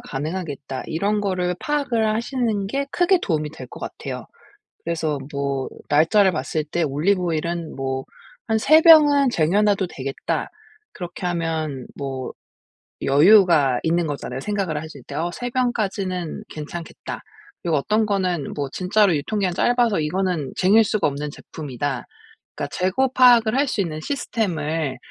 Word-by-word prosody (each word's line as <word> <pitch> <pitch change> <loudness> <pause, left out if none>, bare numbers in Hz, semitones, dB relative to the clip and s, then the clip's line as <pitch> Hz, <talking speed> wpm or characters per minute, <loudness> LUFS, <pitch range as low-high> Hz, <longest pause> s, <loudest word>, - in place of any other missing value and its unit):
가능하겠다. 145 -2 -5
이런 200 +6 0
거를 185 -3 -1
파악을 275 -7 0
하시는 225 -2 -1
게 275 +6 -2
크게 360 +3 +3
도움이 155 - -1
될 - - -10
것 - - -11
같아요. - - -6 0.6
그래서 160 -3 -1
뭐 140 -1 -2 0.2
날짜를 185 +6 +4
봤을 150 +3 -2
때 165 +3 -1
'올리브 160 +7 +1
오일은 170 -1 -2
뭐 135 0 -3 0.4
한 220 - +2
3 310 +8 +6
병은 290 -5 +7
쟁여 175 +3 +2
놔도 200 -3 +2
되겠다.' 135 -3 -3 0.4
그렇게 175 0 -7
하면 160 -6 -2
뭐 135 -2 -5 0.7
여유가 150 - +5
있는 170 0 +1
거잖아요, 140 -3 -4
생각을 190 -3 -2
하실 155 -4 -10
때. - - -9
어 170 +2 -1
'3 245 0 -4
병까지는 195 -8 -2
괜찮겠다.' 155 +2 -7 0.4
그리고 165 -3 +1
어떤 215 +9 +1
거는 185 -7 -1
뭐 140 -2 -3
진짜로 195 +1 +2
'유통 205 +9 -2
기한이 185 -3 0
짧아서 240 -6 +2
이거는 165 -2 -1
쟁일 205 +5 +5
수가 215 0 +1
없는 145 +1 -3
제품이다.' 140 -5 -5 0.5
그러니까 - - -4
재고 190 +9 +1
파악을 240 -3 +6
할 280 +1 +2
수 215 - 0
있는 155 -4 -3
시스템을 160 - -2
175 Hz, 315 characters per minute, -22 LUFS, 150-215 Hz, 0.7 s, 병은